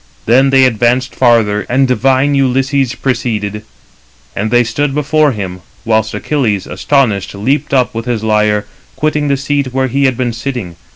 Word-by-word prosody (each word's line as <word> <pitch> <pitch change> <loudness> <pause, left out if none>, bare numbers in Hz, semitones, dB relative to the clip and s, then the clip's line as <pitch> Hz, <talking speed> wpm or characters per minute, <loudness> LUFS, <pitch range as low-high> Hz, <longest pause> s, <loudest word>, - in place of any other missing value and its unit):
Then 130 +4 +4
they 135 -1 +5
advanced 125 +2 +1
farther, 115 -4 +2
and 135 +2 +2
divine 130 +3 +2
Ulysses 135 -1 +1
preceded; 110 -5 -2 0.7
and 110 +2 -2
they 120 +1 +3
stood 135 +5 -2
before 150 0 +2
him; 95 -4 -5 0.3
whilst 110 -1 0
Achilles, 115 -10 -1
astonished, 115 -10 0
leaped 130 +9 -1
up, 130 -3 +1
with 115 0 -5
his 115 -3 -2
lyre, 105 -1 +1 0.3
quitting 150 -1 -1
the 140 -1 +1
seat 140 -1 -2
where 130 +1 0
he 140 +3 +1
had 130 -3 +1
been 125 -2 -1
sitting. 120 -7 -5
125 Hz, 160 wpm, -13 LUFS, 110-135 Hz, 0.7 s, they